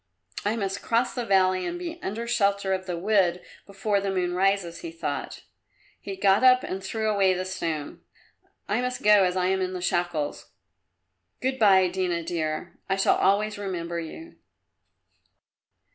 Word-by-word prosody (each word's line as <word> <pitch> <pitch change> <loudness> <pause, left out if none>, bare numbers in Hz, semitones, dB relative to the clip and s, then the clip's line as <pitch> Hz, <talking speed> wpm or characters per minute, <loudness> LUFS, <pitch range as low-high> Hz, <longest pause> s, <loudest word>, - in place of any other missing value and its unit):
"I 205 +2 0
must 195 -3 -3
cross 235 +2 +1
the 245 -2 -4
valley 185 -1 +3
and 345 - -3
be 345 -1 -6
under 220 +4 -4
shelter 200 -4 +1
of 185 0 -3
the 175 -1 -3
wood 185 -2 +2 0.3
before 200 0 -1
the 200 - -2
moon 180 -2 -1
rises," 190 -2 +1
he 335 - -6
thought. 335 0 -5 0.6
He 195 - -6
got 195 +3 +3
up 255 0 +6
and 190 +1 -5
threw 220 +3 -2
away 195 -3 +3
the 185 +1 -3
stone. 165 -5 -4 0.7
"I 215 +4 0
must 250 0 -3
go 210 -1 +6
as 180 0 -1
I 180 - +1
am 190 0 +1
in 185 0 -2
the 180 - -4
shackles. 165 - -2 0.9
Good 260 +1 -2
bye, 190 -4 +6
Dina, 180 -2 -1
dear; 160 0 -4
I 195 - +2
shall 195 - +3
always 205 +2 +1
remember 170 -4 -4
you." 325 - -9
195 Hz, 165 wpm, -26 LUFS, 180-210 Hz, 0.9 s, up